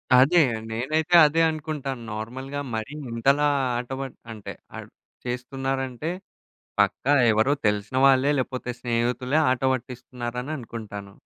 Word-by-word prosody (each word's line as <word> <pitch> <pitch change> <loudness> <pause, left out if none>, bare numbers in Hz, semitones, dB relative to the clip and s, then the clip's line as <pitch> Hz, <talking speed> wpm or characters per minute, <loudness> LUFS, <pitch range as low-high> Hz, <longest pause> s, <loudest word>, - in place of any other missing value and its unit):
అదే 150 +7 +6 0.3
నేనైతే 155 +9 +1
అదే 165 +3 +1
అనుకుంటాను. 150 -5 -4
నార్మల్‌గా 130 +6 -5 0.2
మరి 110 +6 -4 0.2
ఇంతలా 140 +5 +3 0.3
ఆట 120 +1 -5
ప - - -3 0.3
అంటే 105 -2 -7 0.2
ఆహ్, - - -8 0.4
చేస్తున్నారంటే 135 +3 -3 0.7
పక్కా 140 - +2 0.2
ఎవరో 110 +6 +3
తెలిసిన 105 +5 0
వాళ్ళే 135 +1 +5
లేకపోతే, 130 -1 -3
స్నేహితులే 125 +3 0
ఆట 130 -1 0
పట్టిస్తున్నారని 125 +1 -5
అనుకుంటాను. 105 -4 -8
130 Hz, 110 wpm, -25 LUFS, 120-140 Hz, 0.7 s, అదే